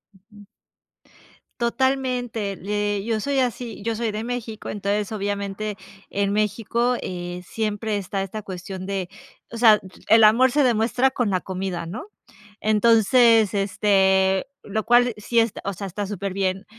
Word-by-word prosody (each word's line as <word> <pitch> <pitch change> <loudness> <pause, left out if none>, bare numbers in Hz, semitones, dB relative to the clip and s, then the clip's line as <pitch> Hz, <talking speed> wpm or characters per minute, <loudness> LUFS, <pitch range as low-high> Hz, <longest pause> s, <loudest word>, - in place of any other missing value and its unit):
Ujú. 205 +2 -18 1.2
Totalmente, 245 -4 -1
le 205 0 -2
yo 225 -1 -1
soy 275 +4 0
así. 245 -3 -2
Yo 225 +1 -2
soy 230 -1 -1
de 215 +1 -4
México, 235 -3 -5
entonces, 205 +1 -2
obviamente, 205 0 -3 0.4
en 200 0 0
México, 225 +4 0
eh, 175 0 -5
siempre 215 -1 -2
está 195 0 -3
esta 200 +2 -5
cuestión 185 0 -7
de 190 -2 -3 0.4
o 230 - -6
sea, 220 -3 +7
d 185 - -13 0.2
el 225 +1 +6
amor 240 +4 +6
se 295 - +2
demuestra 245 +1 +2
con 245 -6 -1
la 185 - 0
comida, 185 -3 -4
¿no? 250 - -7 0.5
Entonces, 225 0 +4
este, 190 -1 +2 0.2
lo 215 +1 -3
cual 240 0 +4
sí, 230 +2 +1
est 225 -2 -1
o 200 -1 -3
sea, 200 +2 -6
está 200 +2 -4
superbién 195 -1 -2
210 Hz, 145 wpm, -23 LUFS, 195-230 Hz, 1.2 s, sea